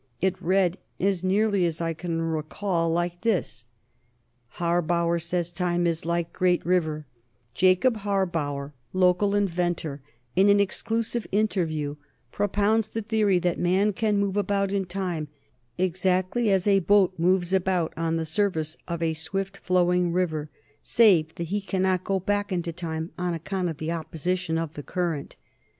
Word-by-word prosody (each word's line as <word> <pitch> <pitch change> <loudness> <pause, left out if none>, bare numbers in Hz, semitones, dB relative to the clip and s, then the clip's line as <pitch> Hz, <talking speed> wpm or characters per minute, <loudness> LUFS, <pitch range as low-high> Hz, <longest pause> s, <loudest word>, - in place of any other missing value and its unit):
It 190 0 0
read, 185 0 +2 0.2
as 190 -1 +1
nearly 200 0 +2
as 165 -1 -3
I 165 -1 -1
can 165 0 -3
recall 165 +2 -1
it, - - +1
like 175 0 -2
this: 195 - -1 0.9
Harbauer 170 0 +1
Says 175 0 -2
Time 175 0 0
Is 165 -1 0
Like 170 0 -1
Great 180 -1 +1
River 160 -4 0 0.5
Jacob 185 - +3
Harbauer, 165 -9 -2 0.2
local 185 +2 +3
inventor, 175 -7 -1 0.3
in 195 +3 +5
an 200 0 +5
exclusive 225 +3 -1
interview, 160 -8 0 0.3
propounds 205 +2 +1
the 225 - -4
theory 210 -3 +2
that 175 -1 0
man 190 +4 +2
can 210 +1 +1
move 200 0 0
about 200 -1 +1
in 200 -1 0
time 175 -4 -3 0.5
exactly 185 +5 +1
as 190 -2 +2
a 200 -1 +5
boat 195 0 +4
moves 180 +1 +2
about 185 -3 +1
on 165 0 -1
the 165 0 -1
surface 160 -2 -1
of 170 -1 -3
a 160 -1 +1
swift 195 +5 -3
flowing 180 -1 +2
river, 160 -4 -1 0.3
save 175 -9 +4
that 170 -1 -5
he 205 +2 -1
cannot 185 -1 0
go 195 -1 0
back 205 +2 -1
into 175 -2 -2
time, 160 -1 -4
on 175 -1 -1
account 180 +2 -2
of 160 - -5
the 160 +2 -3
opposition 165 +1 -2
of 165 -2 -3
the 145 - -6
current. 170 -3 -3
180 Hz, 155 wpm, -26 LUFS, 165-195 Hz, 0.9 s, in